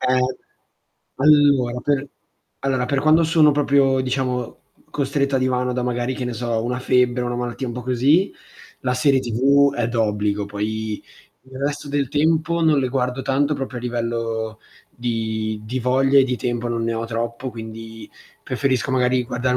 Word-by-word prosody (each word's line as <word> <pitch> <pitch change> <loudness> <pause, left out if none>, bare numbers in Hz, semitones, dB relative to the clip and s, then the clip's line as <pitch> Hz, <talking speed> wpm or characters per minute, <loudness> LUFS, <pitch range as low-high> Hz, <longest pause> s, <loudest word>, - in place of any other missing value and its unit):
Ehm, 130 0 +2 0.9
allora 140 -4 +4
per 145 -1 0 0.5
allora, 130 -2 0
per 140 0 0
quando 155 +3 +4
sono 160 -1 +5
proprio 140 -2 +3
diciamo 125 -2 -2 0.3
costretto 140 -1 -1
a - - +2
divano, 125 -1 0
da 125 0 -2
magari, 120 +1 -1
che 130 - -4
ne 125 - -3
so, 115 -1 -2
una 125 +1 -2
febbre, 125 -1 +2
una 120 0 -2
malattia 120 +1 -3
un - - -4
po' 125 +1 -6
così, 135 - +2 0.5
la 125 -1 -1
serie 135 +1 +3
TV 135 +4 +3
è 120 -3 -1
d'obbligo, 105 -3 0
poi 105 +1 -3 0.4
il 130 0 -12
resto 145 +1 -3
del 140 -2 0
tempo 160 +3 +1
non 155 -3 +4
le 130 - 0
guardo 125 0 -1
tanto, 140 +3 +1
proprio 130 -2 -5
a - - -7
livello 115 -2 -3 0.3
di 110 -2 -3
di 125 +4 -3
voglia 135 +3 +3
e 135 - +6
di 125 -1 -1
tempo 120 -1 -2
non 115 -1 -2
ne 115 0 -1
ho 115 +1 -2
troppo, 115 +2 -4
quindi 110 -1 -9 0.3
preferisco 130 -2 -1
magari 125 -1 +2
guardare 125 +1 -1
125 Hz, 170 wpm, -21 LUFS, 115-135 Hz, 0.9 s, e